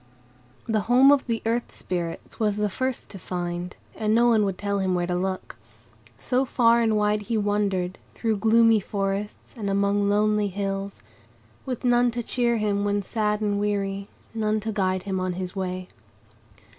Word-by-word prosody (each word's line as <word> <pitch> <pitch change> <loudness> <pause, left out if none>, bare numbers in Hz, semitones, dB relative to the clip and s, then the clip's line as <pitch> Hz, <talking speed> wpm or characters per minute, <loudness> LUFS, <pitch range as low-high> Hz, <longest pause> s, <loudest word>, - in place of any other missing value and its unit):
The 220 -2 +1
home 260 +3 +7
of 285 -2 +3
the 230 -1 -2
Earth 235 +1 -1
Spirits 170 -2 -5
was 210 -2 +1
the 210 0 +1
first 260 +5 -3
to 195 - -8
find, 175 0 -4 0.2
and 215 0 +1
no 240 +1 +5
one 220 -3 +4
would 195 -2 -2
tell 200 0 -1
him 190 -1 +1
where 175 0 0
to 180 - -2
look. 185 -7 -3 0.6
So 255 0 0
far 235 -2 +3
and 220 -2 +2
wide 210 0 +1
he 230 - +1
wandered, 200 -3 0 0.2
through 225 -2 0
gloomy 225 +1 +5
forests 200 +3 -4
and 210 -4 -3
among 200 +1 +2
lonely 210 0 +2
hills, 195 - -4 0.6
with 255 -1 -4
none 245 0 +4
to 240 - -1
cheer 235 0 +1
him 205 -2 0
when 205 0 0
sad 210 0 -1
and 205 -1 0
weary, 200 -1 -1 0.3
none 215 -1 0
to 220 +1 -3
guide 185 -3 0
him 190 -1 -2
on 185 0 -1
his 180 +1 -5
way. 185 -1 -3
205 Hz, 175 wpm, -25 LUFS, 195-225 Hz, 0.6 s, home